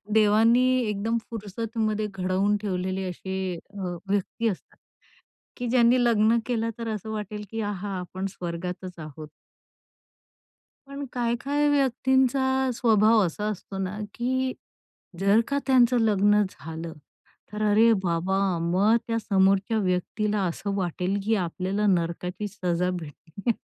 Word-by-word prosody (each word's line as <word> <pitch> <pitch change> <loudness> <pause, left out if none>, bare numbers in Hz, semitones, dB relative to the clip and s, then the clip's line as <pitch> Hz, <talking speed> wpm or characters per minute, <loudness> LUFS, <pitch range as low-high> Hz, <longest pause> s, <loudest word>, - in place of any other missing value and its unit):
देवानी 220 +3 +5 0.2
एकदम 210 +3 -1
फुरसतमध्ये 215 0 -2
घडवून 190 +2 +1
ठेवलेले 190 -1 -2
असे 190 +2 -6 0.4
अ, 180 -2 -3
व्यक्ती 205 +3 0
असतात, 195 - -6 0.8
की 245 - -4
ज्यांनी 240 0 +4
लग्न 225 0 +4
केलं 230 -2 -1
तर 230 -1 -4
असं 215 +1 -6
वाटेल, 210 0 -5
की 225 - -3
आहा! 205 -1 -3
आपण 185 +2 -5
स्वर्गातच 180 0 -6
आहोत. 155 -1 -9 1.6
पण 280 +1 -6
काही-काही 255 +5 0
व्यक्तींचा 265 -1 +2
स्वभाव 220 -1 +4
असा 175 +5 -5
असतो 195 -1 -7
ना, 190 +2 -3 0.2
की 260 +1 0 0.7
जर 200 +3 +5
का 280 - 0
त्यांचं 250 -2 +4
लग्न 210 -1 +4
झालं, 160 +2 -7 0.6
तर 210 - -3
अरे 225 +3 +6
बाबा! 175 +2 0 0.3
मग 205 +6 +4
त्या 230 -1 0
समोरच्या 195 +1 +2
व्यक्तीला 205 +2 0
असं 200 +4 -4
वाटेल, 185 +1 -1
की 220 +2 +2
आपल्याला 190 +3 -1
नरकाची 180 +2 -1
सजा 180 -3 -1
भेटेलीय. 175 - -4
210 Hz, 120 wpm, -26 LUFS, 185-230 Hz, 1.6 s, अरे